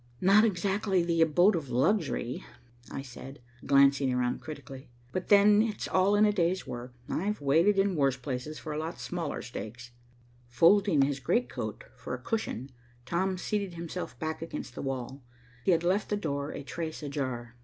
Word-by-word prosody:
"Not 195 Hz, +3 st, +6 dB
exactly 195 Hz, -2 st, +1 dB
the 170 Hz, -1 st, +1 dB
abode 175 Hz, +6 st, +5 dB
of 150 Hz, -6 st, -4 dB
luxury," 135 Hz, -, 0 dB, 0.5 s
I 135 Hz, -, -5 dB
said, 135 Hz, +2 st, -10 dB, 0.3 s
glancing 140 Hz, -1 st, +5 dB
around 125 Hz, -1 st, 0 dB
critically, 135 Hz, -4 st, -9 dB, 0.2 s
"but 185 Hz, -, -3 dB
then 205 Hz, +1 st, +6 dB
it's 220 Hz, -1 st, -2 dB
all 190 Hz, +2 st, +3 dB
in 210 Hz, -, +5 dB
the 210 Hz, -, +5 dB
day's 180 Hz, -1 st, 0 dB
work. 120 Hz, +1 st, -7 dB, 0.2 s
I've 205 Hz, +5 st, -1 dB
waited 165 Hz, +9 st, +3 dB
in 195 Hz, -1 st, +2 dB
worse 135 Hz, -3 st, +2 dB
places 130 Hz, +3 st, -5 dB
for 155 Hz, -, -6 dB
a 150 Hz, -, -2 dB
lot 160 Hz, +2 st, -5 dB
smaller 170 Hz, -4 st, -4 dB
stakes." 120 Hz, 0 st, -8 dB, 0.6 s
Folding 165 Hz, +5 st, +4 dB
his 140 Hz, 0 st, -1 dB
great 235 Hz, -, +1 dB
coat -, -, -5 dB
for -, -, -5 dB
a -, -, -9 dB
cushion, 140 Hz, -, -3 dB, 0.3 s
Tom 185 Hz, +6 st, 0 dB
seated 200 Hz, -1 st, -2 dB
himself 170 Hz, +2 st, -6 dB
back 160 Hz, -1 st, -4 dB
against 165 Hz, -6 st, -6 dB
the -, -, -6 dB
wall. 135 Hz, 0 st, -4 dB, 0.4 s
He -, -, +1 dB
had 165 Hz, -1 st, +2 dB
left 190 Hz, +4 st, +1 dB
the 210 Hz, -, 0 dB
door 145 Hz, -6 st, -3 dB
a -, -, -6 dB
trace 160 Hz, +2 st, -5 dB
ajar. 130 Hz, -5 st, -4 dB
160 Hz, 175 wpm, -29 LUFS, 135-190 Hz, 0.6 s, Not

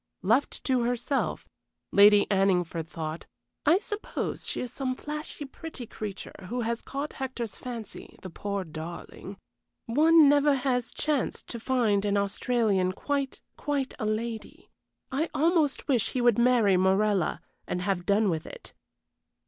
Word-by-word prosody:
Left 230 Hz, +9 st, +1 dB
to 260 Hz, -2 st, +2 dB
herself, 245 Hz, +3 st, -1 dB, 0.4 s
Lady 205 Hz, 0 st, +7 dB
Anningford 180 Hz, -4 st, +1 dB
thought: 160 Hz, -1 st, -6 dB, 0.4 s
"I 325 Hz, +4 st, +7 dB
suppose 420 Hz, +1 st, -4 dB
she -, -, -2 dB
is 250 Hz, -, -5 dB
some 260 Hz, -2 st, -2 dB
flashy, 300 Hz, +1 st, -6 dB
pretty 270 Hz, -2 st, -8 dB
creature 195 Hz, -3 st, -7 dB
who 245 Hz, +2 st, -2 dB
has 230 Hz, 0 st, -2 dB
caught 280 Hz, +2 st, -5 dB
Hector's 255 Hz, -5 st, -4 dB
fancy, 235 Hz, -4 st, -8 dB
the 185 Hz, -, -7 dB
poor 200 Hz, +2 st, -3 dB
darling. 170 Hz, +4 st, -8 dB, 0.5 s
One 310 Hz, +5 st, +6 dB
never 290 Hz, 0 st, +5 dB
has 250 Hz, -3 st, -1 dB
chanced 300 Hz, -3 st, -1 dB
to 235 Hz, -, -5 dB
find 225 Hz, -5 st, +1 dB
an 205 Hz, -1 st, +1 dB
Australian 200 Hz, -2 st, +1 dB
quite, 280 Hz, +4 st, -2 dB, 0.2 s
quite 285 Hz, -2 st, -2 dB
a 215 Hz, -, -1 dB
lady. 220 Hz, +1 st, -4 dB, 0.4 s
I 300 Hz, +5 st, 0 dB
almost 315 Hz, -2 st, +2 dB
wish 245 Hz, -8 st, +1 dB
he 255 Hz, -, 0 dB
would 240 Hz, -2 st, +4 dB
marry 235 Hz, -6 st, +4 dB
Morella 190 Hz, 0 st, +2 dB, 0.3 s
and 180 Hz, -, -2 dB
have 180 Hz, -2 st, -1 dB
done 205 Hz, 0 st, +3 dB
with 160 Hz, -1 st, -3 dB
it." -, -, -11 dB
235 Hz, 140 wpm, -28 LUFS, 200-270 Hz, 0.5 s, Lady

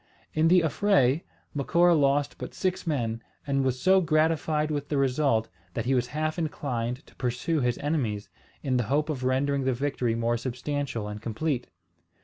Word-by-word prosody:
In 155 Hz, +1 st, +3 dB
the 180 Hz, +1 st, +6 dB
affray, 160 Hz, -5 st, +3 dB, 0.3 s
Macora 170 Hz, +5 st, +3 dB
lost 145 Hz, -2 st, +2 dB
but -, -, -7 dB
six 185 Hz, -1 st, -1 dB
men, 115 Hz, -7 st, -1 dB, 0.2 s
and 140 Hz, -1 st, +1 dB
was 130 Hz, -1 st, 0 dB
so 190 Hz, +4 st, +5 dB
gratified 155 Hz, -1 st, +1 dB
with 145 Hz, -1 st, -3 dB
the 145 Hz, -, 0 dB
result 130 Hz, -4 st, +2 dB, 0.3 s
that 115 Hz, -, -2 dB
he 135 Hz, -, +2 dB
was 125 Hz, -1 st, +1 dB
half 155 Hz, +4 st, -2 dB
inclined 125 Hz, -6 st, -3 dB
to -, -, -20 dB
pursue 125 Hz, +6 st, -1 dB
his 125 Hz, -2 st, +1 dB
enemies, 125 Hz, -9 st, -1 dB, 0.4 s
in 130 Hz, -3 st, +1 dB
the 120 Hz, -, 0 dB
hope 150 Hz, +3 st, +1 dB
of 130 Hz, -4 st, -4 dB
rendering 135 Hz, +2 st, +1 dB
the 130 Hz, 0 st, +1 dB
victory 125 Hz, -3 st, -1 dB
more 115 Hz, +1 st, +1 dB
substantial 130 Hz, -1 st, -3 dB
and 105 Hz, 0 st, -6 dB
complete. 125 Hz, +4 st, -2 dB
140 Hz, 170 wpm, -27 LUFS, 125-155 Hz, 0.4 s, the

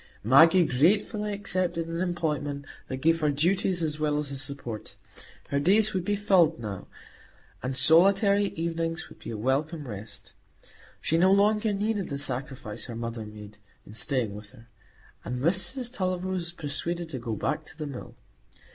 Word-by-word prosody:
Maggie 165 Hz, -, +7 dB
gratefully 205 Hz, -, +2 dB
accepted 185 Hz, -4 st, -1 dB
an 165 Hz, +1 st, -3 dB
employment 150 Hz, -5 st, -2 dB, 0.2 s
that 130 Hz, 0 st, -5 dB
gave 165 Hz, +1 st, +4 dB
her 155 Hz, -2 st, +2 dB
duties 175 Hz, +4 st, +1 dB
as 155 Hz, -1 st, -2 dB
well 150 Hz, -1 st, +1 dB
as 150 Hz, -1 st, -3 dB
a 140 Hz, -, -4 dB
support; 135 Hz, -5 st, -6 dB, 0.5 s
her 140 Hz, -, +1 dB
days 210 Hz, +8 st, +4 dB
would 185 Hz, -2 st, -1 dB
be 205 Hz, +3 st, 0 dB
filled 185 Hz, -7 st, +3 dB
now, 105 Hz, -4 st, -6 dB, 0.7 s
and 130 Hz, +1 st, -3 dB
solitary 200 Hz, +6 st, +5 dB
evenings 165 Hz, 0 st, -2 dB
would -, -, -15 dB
be -, -, -8 dB
a 110 Hz, -, -4 dB
welcome 140 Hz, +6 st, -1 dB
rest. 105 Hz, -1 st, -7 dB, 0.7 s
She 165 Hz, -, +1 dB
no 185 Hz, +2 st, +5 dB
longer 210 Hz, +2 st, +3 dB
needed 205 Hz, -1 st, -1 dB
the 140 Hz, -, -3 dB
sacrifice 130 Hz, -5 st, -3 dB
her 120 Hz, -, -7 dB
mother 115 Hz, -1 st, -5 dB
made 105 Hz, -1 st, -11 dB, 0.3 s
in 105 Hz, -, -12 dB
staying 115 Hz, -1 st, -1 dB
with 105 Hz, 0 st, -9 dB
her, 115 Hz, -2 st, -17 dB, 0.5 s
and 125 Hz, -, -4 dB
Mrs 190 Hz, -, 0 dB
Tulliver 185 Hz, -3 st, -1 dB
was 175 Hz, -2 st, -3 dB
persuaded 170 Hz, +2 st, -3 dB
to 135 Hz, -5 st, -4 dB
go 115 Hz, -2 st, -3 dB
back 150 Hz, +9 st, -1 dB
to 160 Hz, -, -13 dB
the 155 Hz, -, -4 dB
Mill. 140 Hz, -3 st, -8 dB
160 Hz, 165 wpm, -27 LUFS, 130-185 Hz, 0.7 s, Maggie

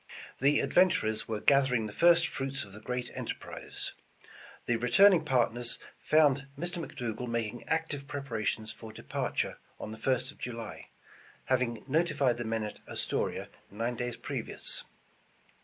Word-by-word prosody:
The 140 Hz, +2 st, +4 dB
adventurers 140 Hz, -12 st, +3 dB
were 110 Hz, -2 st, -2 dB
gathering 130 Hz, -5 st, +4 dB
the 105 Hz, -, -6 dB
first 170 Hz, +3 st, +6 dB
fruits 135 Hz, +1 st, -3 dB
of 100 Hz, -, -14 dB
the 105 Hz, -, -9 dB
great 125 Hz, +2 st, -3 dB
enterprise. -, -, -5 dB, 0.7 s
The 120 Hz, -, +2 dB
returning 175 Hz, -, +6 dB
partners 120 Hz, -4 st, +1 dB, 0.2 s
found 145 Hz, -3 st, +4 dB
Mr. 175 Hz, +2 st, -2 dB
McDougal 125 Hz, -3 st, -4 dB
making 115 Hz, 0 st, -2 dB
ac 160 Hz, 0 st, +3 dB
tive 140 Hz, -1 st, -5 dB
preparation 115 Hz, -6 st, -2 dB
for 110 Hz, 0 st, -8 dB
departure 110 Hz, -, -2 dB, 0.2 s
on 110 Hz, -, -5 dB
the 110 Hz, -, -8 dB
1st 130 Hz, +2 st, +1 dB
of -, -, -19 dB
July, 115 Hz, -3 st, -6 dB, 0.6 s
hav 130 Hz, -1 st, +3 dB
ing 115 Hz, -3 st, -2 dB
notified 145 Hz, -5 st, +2 dB
the 120 Hz, -, -3 dB
men 110 Hz, 0 st, -1 dB
at 105 Hz, -, -6 dB
Astoria -, -, -1 dB, 0.2 s
nine 115 Hz, +4 st, -2 dB
days 120 Hz, 0 st, -3 dB
previous. -, -, -3 dB
125 Hz, 145 wpm, -31 LUFS, 115-145 Hz, 0.7 s, first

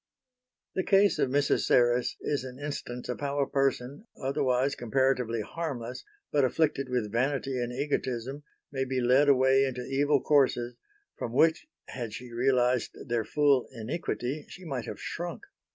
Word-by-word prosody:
The 190 Hz, -, 0 dB
case 195 Hz, +1 st, +4 dB
of -, -, +2 dB
Mrs. 140 Hz, +2 st, +2 dB
Serres 120 Hz, 0 st, +3 dB
is 145 Hz, -3 st, -1 dB
an 130 Hz, -1 st, -8 dB
instance 140 Hz, -4 st, -5 dB
of 125 Hz, -, -4 dB
how 140 Hz, 0 st, -2 dB
a 140 Hz, -, +2 dB
person, 135 Hz, -, -1 dB
otherwise 130 Hz, 0 st, +1 dB
comparatively 125 Hz, -2 st, 0 dB
harmless 125 Hz, -2 st, -5 dB, 0.3 s
but 145 Hz, -2 st, +3 dB
afflicted 135 Hz, 0 st, +1 dB
with 120 Hz, -5 st, -1 dB
vanity 135 Hz, +2 st, 0 dB
and 120 Hz, 0 st, -2 dB
egotism, 130 Hz, 0 st, -2 dB, 0.3 s
may 135 Hz, -1 st, -1 dB
be 130 Hz, 0 st, -1 dB
led 130 Hz, +4 st, +4 dB
away 135 Hz, 0 st, +5 dB
into 125 Hz, -2 st, -3 dB
evil 145 Hz, +1 st, +2 dB
courses, 125 Hz, -4 st, +2 dB, 0.4 s
from 115 Hz, -, -4 dB
which, 160 Hz, -, +3 dB, 0.2 s
had 115 Hz, -4 st, -5 dB
she 125 Hz, 0 st, -9 dB
realised 125 Hz, 0 st, +1 dB
their 120 Hz, -1 st, 0 dB
full 140 Hz, +2 st, +2 dB
iniquity, 130 Hz, +3 st, -4 dB
she 185 Hz, -, -11 dB
might 135 Hz, -7 st, -3 dB
have -, -, -7 dB
shrunk. 175 Hz, -, -5 dB
130 Hz, 150 wpm, -29 LUFS, 125-145 Hz, 0.4 s, away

